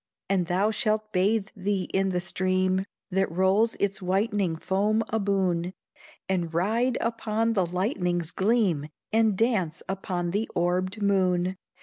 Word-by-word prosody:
And 185 Hz, -3 st, +1 dB
thou 190 Hz, +4 st, +2 dB
shalt 215 Hz, 0 st, -1 dB
bathe 200 Hz, +3 st, +2 dB
thee 195 Hz, -1 st, -1 dB
in 195 Hz, 0 st, +2 dB
the 180 Hz, -1 st, -1 dB
stream 185 Hz, +1 st, 0 dB, 0.3 s
That 190 Hz, 0 st, +1 dB
rolls 190 Hz, +6 st, +2 dB
its 200 Hz, -1 st, -1 dB
whitening 195 Hz, -1 st, 0 dB
foam 205 Hz, +6 st, +1 dB
aboon, 190 Hz, -4 st, 0 dB, 0.5 s
And 175 Hz, -4 st, -1 dB
ride 225 Hz, +9 st, +1 dB
upon 230 Hz, 0 st, 0 dB
the 190 Hz, -5 st, +1 dB
lightning's 180 Hz, -, -1 dB
gleam, 190 Hz, -8 st, +1 dB, 0.3 s
And 220 Hz, -3 st, +3 dB
dance 190 Hz, -8 st, 0 dB
upon 180 Hz, -2 st, -2 dB
the 210 Hz, +4 st, -1 dB
orbed 185 Hz, +4 st, 0 dB
moon! 185 Hz, -2 st, +2 dB
190 Hz, 130 wpm, -27 LUFS, 180-215 Hz, 0.5 s, And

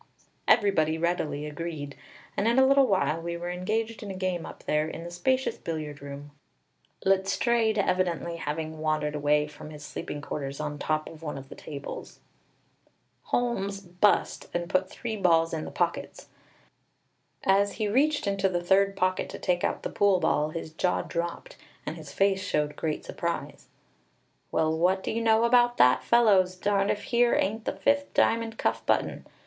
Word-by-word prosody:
Everybody 160 Hz, -8 st, +3 dB
readily 160 Hz, -3 st, -1 dB
agreed, 150 Hz, -2 st, -5 dB, 0.4 s
and 205 Hz, -, +1 dB
in 235 Hz, +2 st, +3 dB
a 265 Hz, -, +7 dB
little 275 Hz, 0 st, +5 dB
while 175 Hz, -6 st, +1 dB
we 170 Hz, 0 st, -4 dB
were 175 Hz, +1 st, -4 dB
engaged 220 Hz, +5 st, -2 dB
in 210 Hz, -, -7 dB
a 190 Hz, -, -5 dB
game 185 Hz, -2 st, -2 dB
up -, -, -11 dB
there 150 Hz, +1 st, +1 dB
in 165 Hz, -, -6 dB
the 170 Hz, -, -7 dB
spacious 260 Hz, +9 st, 0 dB
billiard 155 Hz, -3 st, -5 dB
room, 140 Hz, +1 st, -8 dB, 0.7 s
Letstrayed 215 Hz, +4 st, +2 dB
evidently 180 Hz, -3 st, 0 dB
having 155 Hz, 0 st, -4 dB
wandered 155 Hz, -1 st, 0 dB
away 150 Hz, 0 st, +2 dB
from 150 Hz, 0 st, -11 dB
his 150 Hz, -1 st, -10 dB
sleeping 145 Hz, -, -5 dB
quarters 140 Hz, -1 st, -5 dB
on 150 Hz, -1 st, -4 dB
top 155 Hz, +1 st, -1 dB
of 160 Hz, -1 st, -11 dB
one 150 Hz, -3 st, -5 dB
of 135 Hz, 0 st, -10 dB
the -, -, -9 dB
tables. 145 Hz, -2 st, -8 dB, 1.1 s
Holmes 200 Hz, -5 st, -1 dB
"bust," 185 Hz, +2 st, +1 dB
and 175 Hz, 0 st, -1 dB
put 185 Hz, 0 st, +1 dB
three 230 Hz, -2 st, -5 dB
balls 165 Hz, -5 st, +3 dB
in 155 Hz, -1 st, -3 dB
the -, -, -6 dB
pockets. 175 Hz, -, -2 dB, 1.1 s
As 200 Hz, +1 st, +3 dB
he 215 Hz, -1 st, -1 dB
reached 290 Hz, +7 st, +2 dB
into 195 Hz, -1 st, +1 dB
the 175 Hz, -1 st, -2 dB
third 195 Hz, +2 st, +3 dB
pocket 185 Hz, 0 st, 0 dB
to -, -, -7 dB
take 175 Hz, -1 st, 0 dB
out -, -, -1 dB
the -, -, -2 dB
pool 200 Hz, -2 st, +3 dB
ball, 150 Hz, -3 st, +1 dB
his 160 Hz, 0 st, -6 dB
jaw 180 Hz, +3 st, 0 dB
dropped, 170 Hz, 0 st, -4 dB, 0.3 s
and 155 Hz, -, -4 dB
his 155 Hz, -4 st, -10 dB
face 195 Hz, +3 st, +2 dB
showed 150 Hz, -4 st, -1 dB
great 155 Hz, -2 st, -3 dB
surprise. 170 Hz, 0 st, -4 dB, 0.8 s
"Well, 160 Hz, 0 st, +1 dB
what 185 Hz, +3 st, +2 dB
do -, -, -2 dB
you 230 Hz, -, -1 dB
know 225 Hz, 0 st, +4 dB
about 240 Hz, 0 st, +4 dB
that, 125 Hz, +1 st, +5 dB
fellows! 200 Hz, -6 st, +4 dB
Darned 200 Hz, +1 st, +1 dB
if 205 Hz, -, -1 dB
here 240 Hz, 0 st, +3 dB
ain't 220 Hz, +3 st, 0 dB
the -, -, -1 dB
fifth 280 Hz, +9 st, +1 dB
diamond 225 Hz, -1 st, +2 dB
cuff -, -, 0 dB
button!" -, -, 0 dB
180 Hz, 175 wpm, -27 LUFS, 155-205 Hz, 1.1 s, a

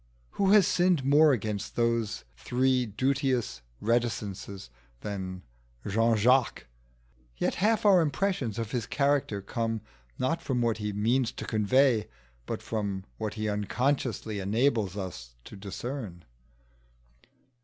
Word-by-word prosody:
Who 195 Hz, -, +1 dB
has 210 Hz, -4 st, +7 dB
sinned 180 Hz, -6 st, +2 dB
more 150 Hz, +2 st, +6 dB
against 105 Hz, -5 st, -2 dB
those 115 Hz, -2 st, 0 dB
three 125 Hz, -, +1 dB
duteous 130 Hz, -, 0 dB, 0.2 s
reticences 105 Hz, -, -2 dB, 0.3 s
than 95 Hz, -3 st, -5 dB, 0.4 s
Jean 115 Hz, +3 st, +2 dB
Jacques? 125 Hz, +3 st, +3 dB, 0.7 s
Yet -, -, 0 dB
half 220 Hz, +1 st, +2 dB
our 190 Hz, -4 st, +7 dB
impressions 150 Hz, -, -1 dB
of 115 Hz, -2 st, -3 dB
his 120 Hz, -3 st, -2 dB
character 140 Hz, -8 st, 0 dB
come 115 Hz, -1 st, -2 dB, 0.4 s
not 165 Hz, +6 st, 0 dB
from 130 Hz, -6 st, -1 dB
what 115 Hz, -2 st, +1 dB
he 105 Hz, 0 st, -2 dB
means 115 Hz, +4 st, +1 dB
to -, -, -6 dB
convey, 115 Hz, +1 st, +3 dB, 0.4 s
but -, -, -4 dB
from 100 Hz, -4 st, -3 dB, 0.2 s
what 110 Hz, -1 st, -3 dB
he 110 Hz, 0 st, -2 dB
unconsciously 110 Hz, +1 st, -1 dB
enables 105 Hz, -1 st, +1 dB
us 80 Hz, -11 st, -7 dB
to -, -, -11 dB
discern. 100 Hz, -, -6 dB
115 Hz, 120 wpm, -28 LUFS, 105-135 Hz, 0.7 s, has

